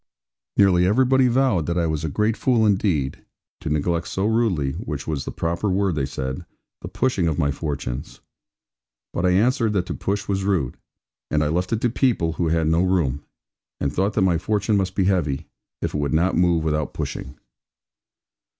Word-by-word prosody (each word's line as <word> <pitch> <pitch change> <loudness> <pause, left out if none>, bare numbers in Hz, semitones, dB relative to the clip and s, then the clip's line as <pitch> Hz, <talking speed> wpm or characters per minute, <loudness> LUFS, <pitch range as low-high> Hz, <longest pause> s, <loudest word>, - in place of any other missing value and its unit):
Nearly 90 -3 +5
everybody 130 +4 +4
vowed 120 - +2
that 85 +1 -1
I 85 - +2
was 80 -1 -2
a 80 - -1
great 105 +8 +1
fool 120 -4 +2
indeed, 95 -9 0 0.4
to - - -4
neglect 85 +3 0
so 95 - -2
rudely 105 - +1
which - - -5
was 75 -4 -3
the - - -4
proper 85 +5 -1
word, 95 0 +1
they 70 -3 -1
said 65 -1 -4 0.4
the - - -6
pushing 105 -10 0
of 80 - 0
my 70 -4 +1
fortunes. 70 -4 -5 0.9
But 90 - +1
I 90 - +3
answered 115 +2 +2
that 95 -3 0
to - - -4
push 100 +1 -2
was 95 -1 -1
rude, 90 -11 0 0.5
and 75 0 +1
I 75 - 0
left 90 +4 -1
it 115 -1 0
to 120 - +2
people 115 -11 +1
who 85 0 -1
had 80 0 +1
no 80 +2 +3
room; 80 -7 +1 0.6
and 70 -2 -1
thought 100 +3 0
that 110 - +1
my 90 -3 +2
fortune 105 +2 0
must 95 -2 0
be 95 - +2
heavy, 85 -8 0 0.4
if - - -2
it 75 - -1
would 70 +1 0
not 90 +4 +2
move 85 -2 +3
without 75 -1 -1
pushing. 65 +2 -5
90 Hz, 190 wpm, -23 LUFS, 75-100 Hz, 0.9 s, Nearly